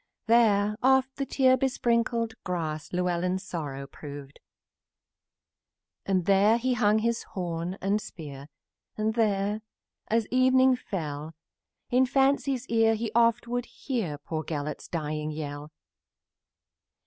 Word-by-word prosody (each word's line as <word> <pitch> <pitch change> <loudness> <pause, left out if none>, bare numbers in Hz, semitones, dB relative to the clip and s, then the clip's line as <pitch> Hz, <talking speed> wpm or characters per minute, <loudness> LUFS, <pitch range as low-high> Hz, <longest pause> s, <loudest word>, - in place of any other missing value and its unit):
Here 210 -3 +4
oft 265 0 +3
the 275 -1 -2
tear 260 -1 +4
besprinkled 235 -3 0
grass 160 -4 -3
Llewellyn's 180 +1 0
sorrow 145 -7 -5
proved. 145 0 -10 1.7
And 185 -3 +1
here 200 +3 +5
he 255 +2 0
hung 215 -3 +3
his 230 +1 0
horn 175 0 -4
and 200 +2 +1
spear, 145 -7 -9 0.5
And 215 +1 0
oft, 210 -1 +1 0.5
as 225 0 +1
evening 260 +1 +5
fell, 155 -8 -5 0.6
In 255 +1 +4
fancy's 270 -1 +2
piercing 225 -2 +2
sounds 235 0 +4
would 245 0 -2
hear 215 - -3
Poor 155 +2 -4
Gelert's 150 -2 -4
dying 155 -2 -3
yell. 150 -1 -6
205 Hz, 115 wpm, -27 LUFS, 160-240 Hz, 1.7 s, here